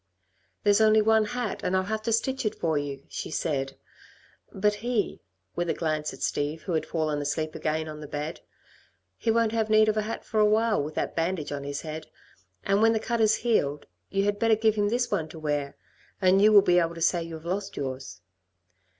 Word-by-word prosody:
"There's 205 +1 +4
only 220 0 +6
one 220 0 +4
hat, 245 -1 -3
and 185 +1 +1
I'll 185 - +1
have 215 +3 -3
to 230 - -2
stitch 265 +4 0
it 215 - -1
for 160 -2 -1
you," 140 -2 -3
she - - -6
said, 135 -4 -2 0.7
"but 210 +2 +1
he" 240 -3 -1 0.3
with 175 0 -1
a - - +1
glance 155 -2 -1
at - - -8
Steve 150 +2 -2
who 180 - -3
had 160 - -1
fallen 155 -3 -1
asleep 155 +2 -2
again 155 0 -2
on 155 -1 -7
the 150 - -8
bed 150 +3 -5 0.7
"he 230 - -3
won't 230 -1 +3
have 220 -1 0
need 215 0 +5
of 215 - 0
a - - +3
hat 220 +2 -5
for 215 - -1
awhile 215 -1 +3
with 150 +2 -5
that - - -2
bandage 165 -2 -1
on 140 -1 -4
his 140 0 -4
head, 155 0 -6 0.6
and 200 +1 +2
when 225 0 +5
the 220 - +1
cut 235 +1 -1
is 215 0 +4
healed, 145 -11 +1 0.2
you 195 0 0
had 205 0 0
better 225 -1 +4
give 220 0 +2
him 205 -1 +1
this 240 +2 0
one 160 -1 -1
to 160 - -10
wear, 145 -2 -2 0.4
and 190 0 +4
you 215 +1 +6
will 205 -2 +8
be 180 0 +4
able 170 0 0
to - - -8
say 175 +1 +2
you 165 0 -6
have 160 +1 -11
lost 190 +3 -3
yours." 130 -5 -5
185 Hz, 220 wpm, -27 LUFS, 155-215 Hz, 0.7 s, will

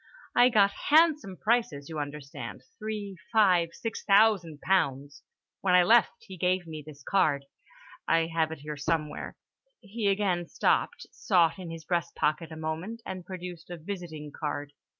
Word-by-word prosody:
I 245 +1 +7
got 200 -4 +4 0.2
handsome 300 - +4
prices, 210 -12 0
you 160 -2 -5
understand, 145 -1 -7 0.2
three, 210 -3 -5
five, 185 -7 +4
six 225 -1 -5
thousand 195 -7 +4
pounds. 140 -7 0 0.4
When 185 -2 +3
I 180 - +7
left, 230 +5 +5
he 190 - -11
gave 180 +1 +1
me 155 -2 -7
this 145 -2 -13
card—I 165 - -1
have 160 -1 +1
it 160 -3 -7
here 150 0 -6
somewhere—" 150 +1 -2 0.4
he 210 0 -3
again 195 -4 +1
stopped, 485 - 0
sought 175 -3 +2
in 180 -2 -7
his 165 -1 -8
breastpocket 165 -2 -1
a - - -7
moment, 160 +9 -5
and 185 -1 -6
produced 180 -3 -8
a 175 - -6
visiting 160 -4 -7
card. 145 -1 -4
175 Hz, 150 wpm, -28 LUFS, 155-200 Hz, 0.4 s, I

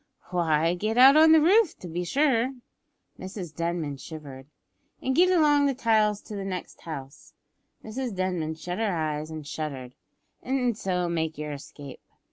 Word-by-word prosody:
"Why, 165 -2 +2
get 215 +6 -2
out 265 +3 +8
on 315 +1 +7
the 320 - +8
roof 380 +4 +4
to 180 - -9
be 175 +2 -3
sure," 265 - +1 0.6
(Mrs 185 -4 -7
Denman 165 -4 -3
shivered) 140 -3 -10 0.5
"and 265 0 -1
get 360 +4 +5
along 295 -5 +4
the 275 - 0
tiles 215 -4 +2
to 210 - -9
the 200 - -4
next 185 -2 -6
house," 140 -4 -9 0.5
(Mrs 235 0 -5
Denman 180 -4 -2
shut 175 +4 -5
her 220 -2 +1
eyes 155 -1 -2
and 155 -2 -7
shuddered) 140 -5 -6 0.5
"an' 250 -2 0
so 185 -4 -2
make 160 -2 -2
yer 150 0 -5
escape. 140 -1 -10
180 Hz, 160 wpm, -26 LUFS, 155-250 Hz, 0.6 s, out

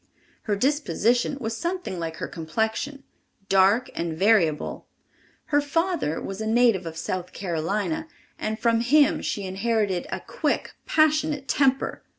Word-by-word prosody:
Her 205 - +3
disposition 250 0 +1
was 225 -3 -3
something 345 - -3
like 165 -1 -4
her - - -4
complexion—dark 210 - -1
and 165 -2 -3
variable. 185 -6 +2 0.6
Her 290 -1 +2
father 315 - 0
was 195 +2 -6
a 220 - -2
native 225 -6 +3
of 160 0 -7
South 180 +2 -4
Carolina, 180 - -2 0.3
and 215 0 -2
from 230 0 +2
him 285 +4 +4
she 205 - -3
inherited 195 -1 0
a - - -3
quick, - - -1 0.2
passionate 305 -2 +2
temper. 270 -1 +1
220 Hz, 130 wpm, -25 LUFS, 185-275 Hz, 0.6 s, him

